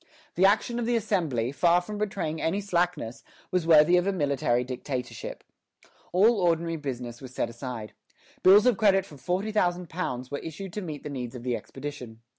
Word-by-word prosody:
The 185 Hz, +3 st, +5 dB
action 230 Hz, +4 st, +1 dB
of 235 Hz, -, -2 dB
the 240 Hz, -, +2 dB
Assembly, 165 Hz, -, 0 dB
far 170 Hz, +4 st, +4 dB
from 205 Hz, +4 st, -7 dB
betraying 195 Hz, -7 st, -2 dB
any 190 Hz, +5 st, 0 dB
slackness, 175 Hz, -, -1 dB, 0.3 s
was 180 Hz, -3 st, 0 dB
worthy 165 Hz, +2 st, +7 dB
of 180 Hz, +2 st, +1 dB
a -, -, +3 dB
military 140 Hz, -8 st, +1 dB
dictatorship. 125 Hz, 0 st, -5 dB, 0.7 s
All 205 Hz, +4 st, +4 dB
ordinary 165 Hz, -1 st, +1 dB
business 125 Hz, -5 st, -6 dB
was 130 Hz, -1 st, -10 dB
set -, -, -1 dB
aside. 120 Hz, -3 st, -7 dB, 0.5 s
Bills 200 Hz, +4 st, +7 dB
of 250 Hz, -4 st, +4 dB
credit 195 Hz, -3 st, +4 dB
for 150 Hz, -, -13 dB
£40,000 180 Hz, -, -1 dB
were 140 Hz, -, -2 dB
issued 170 Hz, +3 st, -7 dB
to 210 Hz, -, -3 dB
meet 155 Hz, -6 st, -6 dB
the -, -, -5 dB
needs 125 Hz, -2 st, -5 dB
of 120 Hz, -, -8 dB
the 125 Hz, -1 st, 0 dB
expedition. 130 Hz, -5 st, -8 dB
165 Hz, 175 wpm, -27 LUFS, 130-195 Hz, 0.7 s, worthy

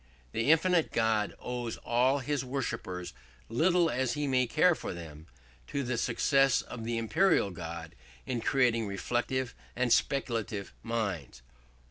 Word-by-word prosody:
The 115 Hz, -, 0 dB
infinite 165 Hz, +1 st, +3 dB
God 110 Hz, -2 st, +1 dB
owes 120 Hz, -2 st, -4 dB
all 125 Hz, +3 st, +2 dB
his 140 Hz, 0 st, -1 dB
worshippers, 115 Hz, -9 st, -4 dB, 0.4 s
little 170 Hz, +8 st, +3 dB
as 130 Hz, -3 st, 0 dB
he 150 Hz, -1 st, -1 dB
may 130 Hz, -2 st, +2 dB
care 170 Hz, +8 st, +4 dB
for -, -, -5 dB
them, 80 Hz, -2 st, -10 dB, 0.4 s
to 140 Hz, -, -2 dB
the 125 Hz, -1 st, -1 dB
success 135 Hz, +3 st, +3 dB
of 120 Hz, -2 st, -8 dB
the 115 Hz, 0 st, -1 dB
imperial 115 Hz, -, +2 dB
God 85 Hz, -2 st, -7 dB, 0.3 s
in 125 Hz, -3 st, -2 dB
creating 115 Hz, -3 st, +2 dB
reflective 120 Hz, +5 st, -1 dB, 0.2 s
and 125 Hz, -1 st, +3 dB
speculative 115 Hz, -7 st, -1 dB
minds. 95 Hz, -, -3 dB
120 Hz, 135 wpm, -30 LUFS, 105-135 Hz, 0.4 s, care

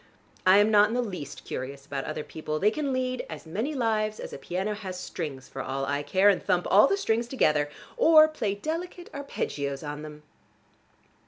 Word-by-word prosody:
I 185 Hz, +1 st, +8 dB
am 205 Hz, +1 st, +5 dB
not 210 Hz, 0 st, +6 dB
in 225 Hz, -, -3 dB
the 250 Hz, -, +2 dB
least 180 Hz, -, -7 dB
curious 135 Hz, +2 st, -6 dB
about 140 Hz, -1 st, -4 dB
other 155 Hz, -, -4 dB
people: 155 Hz, 0 st, -4 dB
they 205 Hz, +6 st, +3 dB
can 285 Hz, +2 st, -2 dB
lead 255 Hz, -1 st, -1 dB
as 155 Hz, 0 st, -8 dB
many 220 Hz, -, -3 dB
lives 215 Hz, -3 st, 0 dB
as -, -, -7 dB
a -, -, -7 dB
piano 190 Hz, +4 st, -2 dB
has 190 Hz, -3 st, -6 dB
strings 145 Hz, -9 st, -6 dB
for 135 Hz, -, -6 dB
all 135 Hz, +1 st, -3 dB
I 145 Hz, +1 st, -1 dB
care, 185 Hz, +7 st, +3 dB
and 200 Hz, -2 st, +4 dB
thump 180 Hz, -2 st, +1 dB
all 210 Hz, +7 st, +7 dB
the 395 Hz, -, +1 dB
strings 235 Hz, -, 0 dB
together, 155 Hz, -, +2 dB, 0.3 s
or 320 Hz, -9 st, +7 dB
play 225 Hz, -10 st, -2 dB
delicate 335 Hz, -, -5 dB
arpeggios 140 Hz, -, -4 dB
on 150 Hz, 0 st, -5 dB
them. 150 Hz, 0 st, -10 dB
200 Hz, 195 wpm, -27 LUFS, 150-245 Hz, 0.3 s, I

